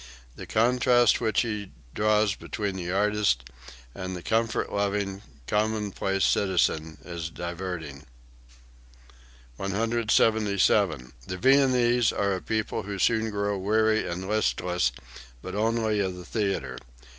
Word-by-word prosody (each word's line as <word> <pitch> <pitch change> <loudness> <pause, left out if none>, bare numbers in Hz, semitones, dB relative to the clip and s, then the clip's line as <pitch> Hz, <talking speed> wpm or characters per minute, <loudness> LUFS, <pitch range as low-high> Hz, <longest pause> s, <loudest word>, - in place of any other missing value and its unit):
The - - -9
contrast 120 +2 +3
which 110 -2 +2
he 105 -4 -3 0.2
draws 105 -1 +2
between 100 -1 -4
the 90 -1 -4
artist 100 -12 +1 0.5
and 95 0 -5
the 90 - -8
comfort 115 0 0
loving, 100 -1 -1 0.2
commonplace 105 - 0
citizen 80 -5 +1
is 85 -2 -5
diverting.) 85 -4 -6 1.5
177. 105 - +1
"The 90 - -4
Viennese 125 -1 +4
are 100 -1 0
a 95 - -3
people 110 -1 -2
who 100 +1 -5
soon 110 +2 +2
grow 100 -1 -1
weary 110 +2 +2
and 90 +2 -4
listless, 90 - 0 0.5
but 95 - -6
only 110 0 0
of 95 -2 -1
the 90 -1 -10
theatre. 95 - -2
100 Hz, 115 wpm, -26 LUFS, 90-110 Hz, 1.5 s, Viennese